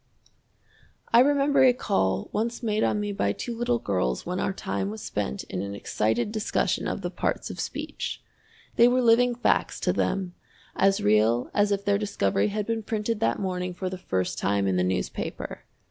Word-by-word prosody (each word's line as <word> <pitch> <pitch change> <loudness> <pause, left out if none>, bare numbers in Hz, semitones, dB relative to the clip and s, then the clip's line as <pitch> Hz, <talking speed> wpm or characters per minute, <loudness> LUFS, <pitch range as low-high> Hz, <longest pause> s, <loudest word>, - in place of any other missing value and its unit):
I 230 - +8
remember 280 +1 +4
a 255 -1 +7
call 100 - 0
once 230 +3 -2
made 215 -1 +1
on 210 - +1
me 205 0 -2
by 100 - 0
two 240 - -5
little 240 +1 +1
girls 90 - -1
when 180 +1 -2
our - - 0
time 100 - -3
was 110 +1 -7
spent 65 +1 -3
in 95 - -5
an 100 0 -5
excited 110 - -1
discussion 215 -1 0
of - - -3
the - - -2
parts - - -2
of - - -9
speech. - - -4 0.6
They 235 - +7
were 250 +1 +2
living 240 +1 +4
facts 245 - +1
to - - +1
them, 185 -2 -1 0.4
as 195 0 +3
real 110 +3 +3
as 205 0 +2
if 200 0 -1
their 200 0 +2
discovery 200 - 0
had 210 0 -2
been 230 0 -1
printed 215 0 -2
that 115 +1 +1
morning 180 -2 -3
for 185 0 -3
the 185 - -4
first 95 - -2
time 100 0 +1
in 95 -1 +1
the 90 - +2
newspaper. 95 0 -3
195 Hz, 190 wpm, -26 LUFS, -, 0.6 s, I